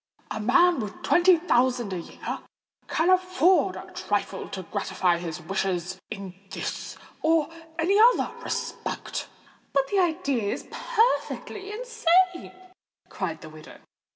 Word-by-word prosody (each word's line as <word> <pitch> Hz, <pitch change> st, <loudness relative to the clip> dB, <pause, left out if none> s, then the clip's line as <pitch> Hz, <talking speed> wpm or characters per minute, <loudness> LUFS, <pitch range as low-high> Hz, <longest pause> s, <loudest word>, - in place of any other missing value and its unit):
A -, -, -3 dB
man 335 Hz, +10 st, +4 dB
with 210 Hz, -3 st, -6 dB
twenty 355 Hz, 0 st, +5 dB
thousand 250 Hz, -, +1 dB
a 180 Hz, -, -2 dB
year 165 Hz, -, -6 dB, 0.5 s
can 340 Hz, +3 st, +2 dB
afford 370 Hz, 0 st, +3 dB
a -, -, -9 dB
trifle -, -, -2 dB
to -, -, -5 dB
gratify 175 Hz, -2 st, 0 dB
his 170 Hz, -2 st, -5 dB
wishes 185 Hz, 0 st, -2 dB
in 195 Hz, -2 st, -6 dB, 0.2 s
this -, -, -5 dB, 0.2 s
or 320 Hz, -1 st, +3 dB, 0.3 s
any 370 Hz, +5 st, +3 dB
other 480 Hz, +3 st, +5 dB
respect." -, -, -4 dB, 0.5 s
"But 275 Hz, -1 st, +2 dB
the 400 Hz, -, +2 dB
idea 280 Hz, -, +1 dB
is -, -, -7 dB
perfectly 460 Hz, -4 st, 0 dB
insane!" 375 Hz, -6 st, +2 dB, 0.6 s
cried 165 Hz, -5 st, -4 dB
the 155 Hz, -, -9 dB
widow. 155 Hz, 0 st, -13 dB
320 Hz, 125 wpm, -26 LUFS, -, 0.6 s, twenty